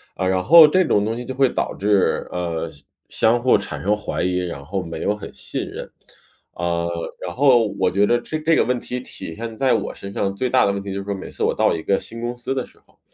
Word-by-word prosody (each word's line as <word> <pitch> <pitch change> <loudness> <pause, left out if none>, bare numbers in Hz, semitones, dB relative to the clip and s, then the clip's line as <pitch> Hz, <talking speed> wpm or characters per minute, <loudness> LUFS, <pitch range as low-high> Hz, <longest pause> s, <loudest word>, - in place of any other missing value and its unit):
啊， 95 - -1
然 95 0 +1
后 160 +1 +9
这 185 +5 +3
种 105 -7 +2
东 110 +1 -1
西 125 - -6
就 130 - -5
会 135 -2 +4
导 - - -2
致， 100 -1 +1
呃， 85 -2 -3
相 - - -15 0.3
相 120 +2 +2
互 125 -2 +4
产 100 - -6
生 105 +2 +2
怀 105 - -4
疑， 90 0 0
然 85 -6 -5
后 95 +6 -3
没 80 -2 -6
有 105 - 0
很 105 - -9
信 - - -4
任。 - - -8 0.6
啊， 85 0 -1 0.4
然 90 -1 -6
后 125 -5 +5
我 95 - +3
觉 100 +2 +3
得 120 +3 +2
这 155 - -4
这 160 +1 +2
个 - - +4
问 125 -1 0
题 125 0 -5
体 95 -8 -8
现 115 -1 -6
在 135 -1 +3
我 - - -2
身 100 0 -8
上， 100 0 -1
最 130 - -1
大 - - +4
的 100 - +2
问 100 - -2
题 100 -1 -6
就 100 - -3
是 - - -5
说 100 0 -2
每 95 - -8
次 - - -8
我 - - +2
到 - - +3
一 80 - -4
个 100 - +1
新 115 +1 -8
公 120 +1 -3
司 120 +2 -3
的 130 - -2
时 - - -22
候， - - -31
105 Hz, 290 characters per minute, -21 LUFS, 95-125 Hz, 0.6 s, 后